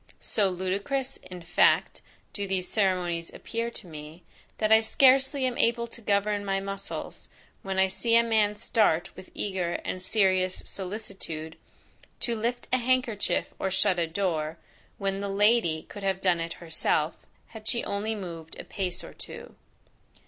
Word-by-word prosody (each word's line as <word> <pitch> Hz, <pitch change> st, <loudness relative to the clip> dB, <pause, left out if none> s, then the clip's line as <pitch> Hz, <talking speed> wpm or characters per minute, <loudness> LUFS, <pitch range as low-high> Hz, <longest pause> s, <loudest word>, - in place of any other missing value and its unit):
So 205 Hz, -3 st, +1 dB
ludicrous, 200 Hz, +9 st, -2 dB
in 180 Hz, -1 st, -10 dB
fact, 170 Hz, -, +3 dB, 0.3 s
do 200 Hz, -1 st, -2 dB
these 190 Hz, -1 st, -1 dB
ceremonies 180 Hz, -5 st, 0 dB
appear 230 Hz, +1 st, -3 dB
to 235 Hz, -, -8 dB
me, 155 Hz, +1 st, -10 dB, 0.3 s
that 215 Hz, 0 st, +1 dB
I 220 Hz, -, +9 dB
scarcely 265 Hz, +4 st, +4 dB
am 250 Hz, -1 st, -1 dB
able 235 Hz, 0 st, +3 dB
to 235 Hz, 0 st, -10 dB
govern 205 Hz, 0 st, +1 dB
my 195 Hz, -1 st, 0 dB
muscles, 195 Hz, 0 st, -5 dB, 0.3 s
when 195 Hz, -1 st, -3 dB
I 190 Hz, -, +6 dB
see 230 Hz, +5 st, +1 dB
a 235 Hz, -, +7 dB
man 215 Hz, -2 st, +2 dB
start 205 Hz, -5 st, +2 dB
with 185 Hz, -, -11 dB
eager, 185 Hz, -4 st, -1 dB
and 185 Hz, -, -3 dB
serious 185 Hz, -2 st, +2 dB
solicitude 190 Hz, -5 st, -5 dB, 0.7 s
to 235 Hz, -, 0 dB
lift 235 Hz, +2 st, -2 dB
a -, -, +6 dB
handkerchief, 245 Hz, -4 st, +1 dB
or 190 Hz, -, 0 dB
shut 190 Hz, -1 st, +2 dB
a 165 Hz, -, +1 dB
door, 160 Hz, -3 st, -1 dB, 0.4 s
when 195 Hz, -1 st, -1 dB
the 200 Hz, 0 st, -3 dB
LADY 200 Hz, -5 st, +3 dB
could 205 Hz, -, -10 dB
have 195 Hz, -1 st, 0 dB
done 180 Hz, -3 st, +3 dB
it 165 Hz, 0 st, -3 dB
herself, 160 Hz, -1 st, -1 dB, 0.2 s
had 220 Hz, -1 st, -9 dB
she 235 Hz, -, +3 dB
only 215 Hz, +2 st, -2 dB
moved 165 Hz, -5 st, -7 dB
a -, -, -5 dB
pace 185 Hz, -2 st, -3 dB
or -, -, -10 dB
two. -, -, -9 dB
195 Hz, 160 wpm, -28 LUFS, 180-220 Hz, 0.7 s, I